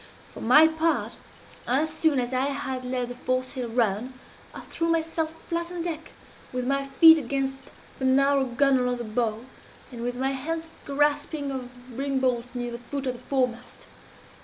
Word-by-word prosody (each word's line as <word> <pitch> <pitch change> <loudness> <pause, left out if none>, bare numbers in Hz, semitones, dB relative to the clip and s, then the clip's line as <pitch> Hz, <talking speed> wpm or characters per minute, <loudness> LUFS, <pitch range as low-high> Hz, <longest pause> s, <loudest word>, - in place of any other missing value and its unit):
For - - -9
my 300 +7 +7
part, 320 +1 0 0.5
as 285 +6 +1
soon 315 -3 +2
as 245 +1 -2
I 255 +1 +2
had 265 -2 -3
let 250 -1 -2
the - - -5
foresail 255 0 -2
run, 230 +1 0 0.4
I - - -9
threw 330 - -3
myself 325 -1 0 0.2
flat 340 0 -2
on 350 -2 -4
deck, 325 -2 -5 0.4
with 250 0 -2
my 275 +1 +1
feet 320 +4 +8
against 270 0 -3 0.3
the 265 - -1
narrow 275 +1 +4
gunwale 255 0 +2
of - - -3
the 240 - -4
bow, 220 +1 -2 0.5
and 240 -2 -7
with 245 +1 -2
my 265 +1 0
hands 320 +5 -4 0.2
grasping 290 0 0
a 255 -2 -5 0.2
ring 275 +2 -1
bolt 250 -2 +1
near 245 -1 -3
the 235 - -6
foot 275 +3 -5
of 255 - 0
the 240 - -11
foremast. 250 -3 -2
265 Hz, 175 wpm, -26 LUFS, 245-295 Hz, 0.5 s, feet